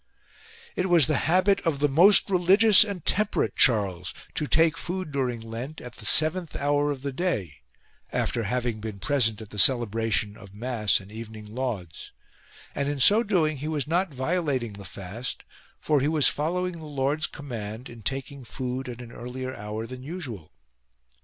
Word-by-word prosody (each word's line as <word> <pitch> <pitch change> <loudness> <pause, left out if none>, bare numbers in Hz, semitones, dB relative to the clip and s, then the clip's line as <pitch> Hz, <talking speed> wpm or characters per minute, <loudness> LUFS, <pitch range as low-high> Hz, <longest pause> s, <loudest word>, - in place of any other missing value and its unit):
II. - - -30 0.4
It - - -2
was 170 -5 +6
the 155 - 0
habit 185 +3 +4
of 165 -4 -1
the 145 +1 +2
most 175 +9 +6
religious 195 +3 +7
and 200 -6 -6
temperate 210 +1 +1
Charles 95 - +2 0.2
to 150 - -2
take 160 +4 +3
food 180 -1 -4
during 125 -4 -2
Lent 115 +7 -7
at 125 -2 -10
the 105 - -4
seventh 160 +4 +2
hour 145 +1 +1
of 140 -2 -4
the 140 - -2
day 130 - -2 0.5
after 115 - -1
having 120 +1 -2
been 110 -1 -6
present 115 -3 0
at 105 - -15
the 105 - -5
celebration 115 -3 +2
of 100 -1 -14
mass 110 -3 0
and 95 +1 -14
evening 110 -1 -9
lauds: 110 -10 -5 0.6
and 140 0 -2
in 145 -1 -3
so 205 - +6
doing 170 -9 +1
he 145 +3 -5
was 150 -3 -2
not 175 +3 0
violating 135 - -2
the 100 -1 -10
fast 100 +6 -7 0.4
for 150 -3 +1
he 140 - +1
was 155 -2 +4
following 175 +3 -1
the 160 - -10
Lord's 145 +2 -1
command 115 -4 -7
in 120 -1 -12
taking 135 +5 -4
food 125 +2 -5
at 120 0 -8
an 120 - -10
75 - - -14
CHARLES - - -10
IN 125 +1 -7
LENT 130 0 -4
earlier - - -9
hour 105 +2 -5
than 125 +2 -9
usual. 130 - -7
130 Hz, 185 wpm, -26 LUFS, 110-155 Hz, 0.6 s, religious